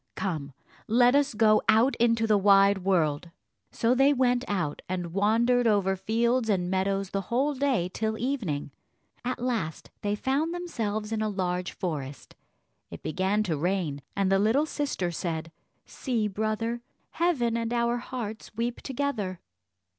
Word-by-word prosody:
Come, 155 -7 -3 0.3
let 245 +3 +5
us 280 -4 +2
go 215 0 +4
out 225 +5 +4
into 230 -1 +3
the 215 -1 +3
wide 195 0 +5
world!" 170 -4 +1 0.4
So 230 +1 +2
they 270 +3 +4
went 250 -2 +2
out, 180 -8 -2
and 175 -2 -3
wandered 230 +5 +3
over 200 -3 +2
fields 230 +4 0
and 180 -3 +1
meadows 195 0 0
the 195 - -1
whole 270 +5 +1
day 265 -9 +1
till 220 +4 -2
evening. 220 - -2 0.5
At 250 +1 -2
last 225 -11 -3
they 205 0 0
found 285 +9 -1
themselves 220 -12 -3
in 220 -1 -1
a 215 - 0
large 180 -3 -2
forest; 145 -6 -5 0.6
it - - -10
began 190 +5 0
to 175 -6 -1
rain, 165 -3 -1
and 195 -1 +1
the 195 - +4
little 225 +9 +3
sister 285 - -2
said, 165 -1 -4 0.3
"See, 235 -5 -2
brother, 220 +3 -2 0.3
heaven 270 -10 +1
and 230 0 -2
our 235 0 +1
hearts 235 -3 -6
weep 235 +1 -2
together." 240 -9 -3
215 Hz, 150 wpm, -27 LUFS, 190-245 Hz, 0.6 s, let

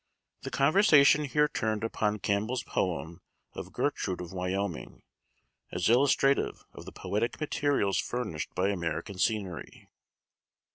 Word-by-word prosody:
The - - -5
conversation 150 -1 +5
here 150 +2 +2
turned 110 -6 -2
upon 105 -2 -1
Campbell's 110 +6 -1
poem 85 -2 -3 0.3
of - - -8
"Gertrude 90 - -2
of 90 0 -7
Wyoming," 90 -1 -4 0.7
as 90 +3 0
illustrative 135 +2 +2
of - - -11
the - - -9
poetic 110 +4 -2
materials 145 -9 0
furnished 110 -11 -3
by 95 +2 +1
American 85 0 -3
scenery. 100 -6 -3
105 Hz, 115 wpm, -29 LUFS, 90-135 Hz, 0.7 s, conversation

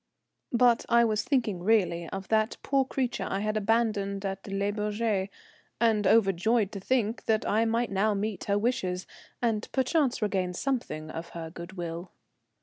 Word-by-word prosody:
But 240 -1 +4
I 235 0 +5
was 215 -2 +1
thinking 230 -10 0
really 180 -5 +2
of 195 0 -6
that 220 +1 +2
poor 275 -1 +2
creature 250 -7 -2
I 195 - -1
had 215 0 -1
abandoned 210 -2 0
at 195 +1 -4
Le 200 +1 -1
Bourget, 210 -1 -1 0.5
and 215 -3 +3
overjoyed 215 +1 +3
to 200 - -5
think 230 +1 0
that 220 -1 +1
I 220 +2 +2
might 230 +1 0
now 205 +2 +2
meet 205 0 -3
her 200 0 +1
wishes, 195 -5 -1 0.4
and 225 -2 0
perchance 265 0 +1
regain 190 -4 0
something 175 - -2
of 165 +1 -6
her 165 -1 -6
good 170 +2 -9
will. 175 0 -5
210 Hz, 160 wpm, -28 LUFS, 195-230 Hz, 0.5 s, I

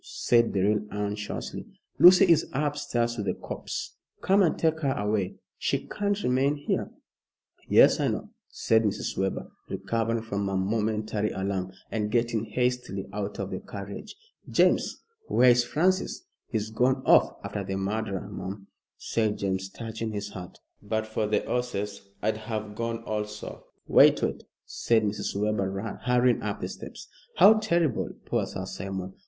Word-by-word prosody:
said 115 -1 +2
Beryl, 100 +2 +2
anxiously. 105 0 -4 0.4
"Lucy 185 +2 +9
is 170 -4 +3
upstairs 135 -5 -1
with 105 -2 -3
the 90 - 0
corpse. - - -6 0.2
Come 195 +2 +4
and 175 - +3
take 160 -1 +1
her 140 -4 +1
away. 105 -3 -1 0.2
She - - -1
can't 205 0 -2
remain 135 +3 +2
here." 145 - -2 0.8
"Yes, - - +6
I - - +2
know," - - -3 0.2
said 110 -1 +2
Mrs. 105 -3 -2
Webber, 95 0 -2 0.2
recovering 115 +4 -1
from 100 -2 -2
her 95 -1 -1
momentary 105 +1 0
alarm, 95 -1 -2 0.2
and 105 -1 -1
getting 115 -1 0
hastily 125 -6 -1
out 105 0 -4
of 100 -1 -4
the 95 - -3
carriage. 100 - -8 0.3
"James, - - +2 0.2
where 125 0 +6
is 120 0 +4
Francis?" 180 - 0 0.2
"He's 110 -2 -2
gone 130 +3 +1
off - - +5
after - - -4
the 95 - -3
murderer, 100 0 -2
mum," 100 0 -7 0.3
said 110 -2 -1
James, 95 -1 -2
touching 110 0 -5
his 105 0 -4
hat; 90 -3 -9 0.2
"but 110 +1 -2
for 110 -1 -2
the 105 - 0
'orses 105 -5 -3
I'd 110 +1 +1
have 110 -1 -5
gone 115 +1 -3
also." 105 -1 -5 0.2
"Wait - - +6
wait," - - -2 0.2
said 115 -2 +1
Mrs. 105 -1 -2
Webber, 100 0 -1
hurrying 125 0 +3
up - - -3
the - - -4
steps. - - -9 0.3
"How 215 +2 +7
terrible 170 - +1 0.2
poor - - 0
Sir 95 - -5
Simon. 95 0 -5
110 Hz, 150 wpm, -27 LUFS, 100-125 Hz, 0.8 s, Lucy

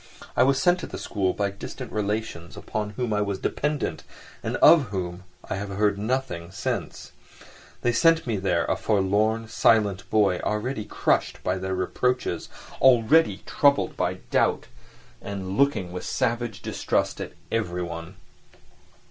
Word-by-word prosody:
I - - +3
was 135 +1 +4
sent 180 0 +3
to - - -6
the - - -7
school 95 -3 -1
by 100 +1 -1
distant 100 - -8
relations, 105 -5 -3
upon 105 -1 -3
whom 120 -3 -1
I 105 - +1
was 100 -1 -1
dependent 150 +8 -2 0.4
and - - -3
of 160 -5 +7
whom 90 -3 -5 0.2
I - - -3
have 100 +1 -5
heard 100 0 +1
nothing 110 -7 -2
since—they 120 - -5
sent 165 +7 +4
me 115 -4 -1
there 95 0 +1
a - - +1
forlorn, 110 +2 +1
silent 105 -4 +2
boy, 100 -4 +3
already 105 +1 -2
crushed - - 0
by 95 +1 0
their 95 0 -2
reproaches, 95 +1 -1 0.3
already 130 +5 +5
troubled 140 -2 +2
by - - 0 0.2
doubt, - - +2 0.6
and 95 -1 -5
looking 110 -10 +2
with 90 0 -5
savage 115 -4 -1
distrust - - -1
at - - -6 0.2
everyone. 90 -4 -3
105 Hz, 140 wpm, -25 LUFS, 95-120 Hz, 0.6 s, of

